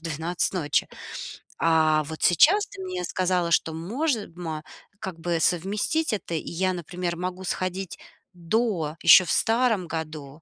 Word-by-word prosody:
12 165 +2 -2
ночи. 150 -6 0 0.7
А 155 -2 +3
вот 160 +1 -7
сейчас 355 - +5
ты 395 -1 -10
мне 370 -1 -4
сказала, 180 - 0
что 160 -1 +2
може 220 - -2
мо 160 -3 -5 0.4
как 180 -3 -6
бы 170 0 -1
совместить 205 - +1
это. 200 -5 -4
И 155 - -4
я, 185 +2 0
например, 175 0 -4
могу 185 +1 -4
сходить 185 0 -3 0.4
до 175 -3 -1
ещё 170 +2 +9
в 155 - -2
старом 225 -6 +2
году, 155 -2 -6
175 Hz, 145 wpm, -25 LUFS, 165-200 Hz, 0.7 s, ещё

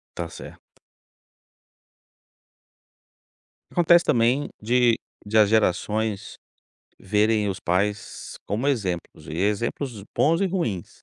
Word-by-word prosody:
Tá 85 -1 -4
certo. - - -12 3.0
Acontece 175 0 +5
também 120 +5 +2
de 120 +1 +3 0.3
de 110 +2 0
as 105 -2 +6
gerações 110 0 0 0.6
verem 105 +1 +1
os 95 - -6
pais 100 +4 -2
como 115 +6 -2
exemplos 100 -11 -2
e - - -6
exemplos 105 +4 -2
bons 165 +4 +3
e 195 - +2
ruins. 120 - -3
110 Hz, 100 wpm, -24 LUFS, 100-125 Hz, 3.0 s, as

